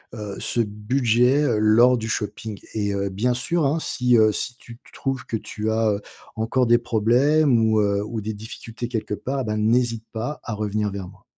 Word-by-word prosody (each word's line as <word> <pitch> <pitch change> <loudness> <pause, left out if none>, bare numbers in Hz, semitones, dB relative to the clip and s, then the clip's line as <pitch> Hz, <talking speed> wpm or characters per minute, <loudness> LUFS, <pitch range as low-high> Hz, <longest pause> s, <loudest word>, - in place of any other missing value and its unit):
heu, 105 -3 -6
ce - - -2
budget 120 +5 +2
lors 115 +4 +5
du 110 -1 -4
shopping 105 -1 -4
et 105 -2 -1
heu, 100 0 -1
bien 110 +6 0
sûr 155 +6 0
hein, 145 +4 +1
si, 125 -5 +1
heu, 110 -1 +5
si 120 - -3
tu 115 -2 -13
tu - - -19
trouves 135 -2 -3
que 115 - -2
tu 105 0 -4
as, 110 0 +2
heu, 100 0 -2 0.3
encore 115 +3 +1
des 120 +1 +6
problèmes 125 +5 +3
ou, 110 -1 +3
heu, 100 -1 +1
ou 110 0 -4
des 110 +2 -4
difficultés 115 +2 -7
quelque 110 -3 -3
part, 130 +5 -3
ben, 105 0 -2
n'hésite 115 +1 +1
pas 120 +7 -4
à 115 - -4
revenir 105 0 -1
vers 100 -2 -6
moi. 95 +1 -17
110 Hz, 200 wpm, -23 LUFS, 105-125 Hz, 0.3 s, des